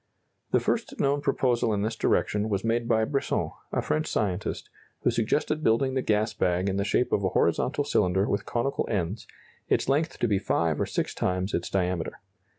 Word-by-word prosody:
The - - +3
first - - -2
known 140 +1 +2
proposal 125 -5 +1
in 100 - -1
this 110 +1 -1
direction 105 -1 +1
was 100 -2 -1
made 115 +1 0
by 110 -2 +3
Brisson, 140 +3 -1 0.2
a - - 0
French 155 +1 0
scientist, 100 -2 -2 0.4
who - - +3
suggested 150 +7 0
building 130 +4 +2
the 130 - +1
gas 105 -1 +1
bag 90 -1 +1
in 95 - -1
the 100 - +1
shape 105 +5 +1
of 100 - +1
a 95 - +2
horizontal - - +1
cylinder 95 +3 +2
with 100 0 0
conical 130 +4 -1
ends, 100 0 -2 0.4
its - - +2
length 150 +5 +1
to 120 - +1
be 100 -3 +2
five - - 0
or - - 0
six - - -2
times 95 +2 -1
its 85 - -1
diameter. 90 -3 -1
110 Hz, 190 wpm, -27 LUFS, 95-125 Hz, 0.4 s, The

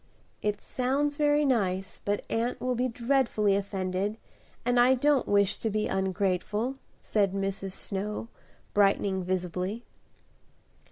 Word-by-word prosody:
"It 210 -1 -1
sounds 275 +3 0
very 295 0 +3
nice, 195 -7 0
but 205 0 -1
aunt 235 +2 -1
will 255 0 0
be 250 +1 +1
dreadfully 235 -4 +2
offended 195 +1 -2 0.5
and 245 0 +3
I 250 +2 +6
don't 285 +1 +2
wish 200 -1 +3
to 225 - -1
be 215 0 0
ungrateful," 190 +6 -1 0.2
said 200 -3 +1
Mrs. 195 -1 -2
Snow, 210 +3 -4 0.5
brightening 195 -2 +3
visibly. 185 +4 -2
210 Hz, 120 wpm, -28 LUFS, 195-245 Hz, 0.5 s, I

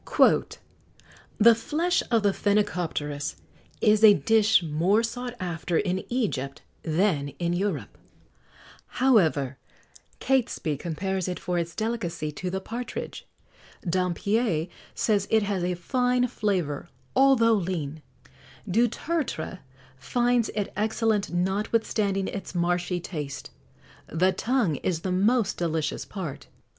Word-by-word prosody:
[XX - - +3
70] - - -15 0.8
"The 230 +2 +7
flesh 315 +10 0
of 230 -3 +2
the 200 -1 +3
phenicopterus 175 -9 -1 0.5
is 215 0 +4
a 210 -2 +9
dish 220 -3 +4
more 170 +8 +2
sought 245 +1 -4
after 175 -2 -2
in 185 -1 0
Egypt 155 - -2 0.2
than 160 -3 +1
in 170 -1 -1
Europe; 175 - -2 1.0
however, 160 - +3 0.6
Catesby 245 - 0
compares 185 +3 -2
it 180 - -3
for 175 0 -1
its 170 0 -4
delicacy 175 -9 -2
to 180 +5 -4
the 190 +1 -2
partridge; 235 +5 -6 0.6
Dampier 185 +1 +1 0.3
says 205 -3 +1
it 220 -1 +3
has 200 -3 -1
a 180 0 0
fine 250 +7 +1
flavour, 180 - -2 0.3
although 260 -4 +5
lean; 165 -7 -2 0.7
Dutertre 240 - -1 0.4
finds 240 - +1
it 205 -2 -2
excellent 215 0 0
notwithstanding 195 +2 0
its 195 -2 -6
marshy 175 +1 0
taste; 150 -5 -6 0.6
the 180 +4 +2
tongue 225 - 0
is 165 +1 -2
the 185 - -2
most 205 +3 +2
delicious 160 -3 -1
part." 175 -9 -6
190 Hz, 115 wpm, -26 LUFS, 170-225 Hz, 1.0 s, a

